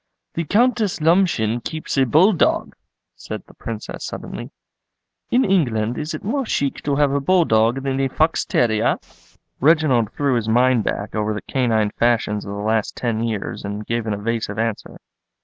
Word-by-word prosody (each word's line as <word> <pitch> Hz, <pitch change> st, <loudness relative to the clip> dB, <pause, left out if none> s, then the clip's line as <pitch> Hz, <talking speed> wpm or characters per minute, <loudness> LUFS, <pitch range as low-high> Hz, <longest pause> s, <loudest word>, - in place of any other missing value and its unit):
"The 165 Hz, -, -2 dB
Countess 220 Hz, -, +2 dB
Lomshen 155 Hz, -, +2 dB
keeps 155 Hz, -1 st, -4 dB
a 135 Hz, -2 st, +3 dB
bull 175 Hz, -, +5 dB
dog," 170 Hz, -, +1 dB, 0.4 s
said -, -, -7 dB
the -, -, -18 dB
Princess 110 Hz, -2 st, -7 dB
suddenly. -, -, -6 dB, 0.8 s
"In 250 Hz, +2 st, +3 dB
England 120 Hz, -, +1 dB
is 155 Hz, +1 st, -4 dB
it -, -, -8 dB
more 270 Hz, +7 st, -1 dB
chic 140 Hz, -, -1 dB
to 145 Hz, -1 st, +1 dB
have 145 Hz, -1 st, +3 dB
a 140 Hz, -, +1 dB
bull 175 Hz, +5 st, +3 dB
dog 115 Hz, +3 st, +2 dB
than 135 Hz, -1 st, -1 dB
a 135 Hz, -, +2 dB
fox 155 Hz, +5 st, +1 dB
terrier?" 110 Hz, -3 st, +1 dB, 0.6 s
Reginald 140 Hz, -7 st, +3 dB
threw 140 Hz, -2 st, 0 dB
his 110 Hz, -1 st, -2 dB
mind 125 Hz, 0 st, +3 dB
back 100 Hz, -, -3 dB
over 110 Hz, 0 st, -1 dB
the 105 Hz, -, -4 dB
canine 110 Hz, -5 st, +1 dB
fashions 115 Hz, -3 st, 0 dB
of 100 Hz, -, -6 dB
the 100 Hz, -, -5 dB
last 110 Hz, 0 st, 0 dB
ten 115 Hz, -2 st, -1 dB
years 110 Hz, -4 st, -3 dB
and 105 Hz, +1 st, -5 dB
gave 115 Hz, -1 st, -2 dB
an 110 Hz, -, 0 dB
evasive 115 Hz, +2 st, -3 dB
answer. 115 Hz, -1 st, -3 dB
125 Hz, 175 wpm, -21 LUFS, 110-155 Hz, 0.8 s, bull